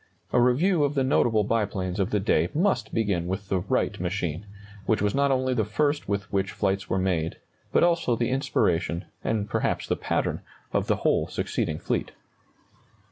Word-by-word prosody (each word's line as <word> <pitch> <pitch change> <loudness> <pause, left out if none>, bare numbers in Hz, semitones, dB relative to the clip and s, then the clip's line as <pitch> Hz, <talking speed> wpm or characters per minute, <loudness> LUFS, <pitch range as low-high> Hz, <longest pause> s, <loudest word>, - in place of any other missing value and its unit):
A 125 - +5
review 150 +8 +3
of 145 +1 0
the 135 - +2
notable 120 -5 +3
biplanes 100 -4 -1
of 95 - +1
the 105 - +1
day 90 -4 +2
must 160 - +1
begin 100 -6 0
with 95 +2 -4
the 95 - +1
Wright 105 0 -1
machine, 90 0 -3 0.4
which 110 - +2
was 105 -1 +1
not 140 0 +2
only 130 -1 +1
the 115 -3 +1
first 145 +7 0
with 100 -1 0
which 95 0 0
flights 95 -2 -1
were - - +1
made, 90 -4 0 0.4
but - - +4
also 170 -8 +2
the 120 +1 -1
inspiration 85 - 0 0.2
and 105 -2 -1
perhaps - - -1
the - - 0
pattern - - -1 0.3
of - - +1
the - - +3
whole - - +3
succeeding 75 - -2
fleet. - - -2
105 Hz, 180 wpm, -26 LUFS, 95-130 Hz, 0.4 s, A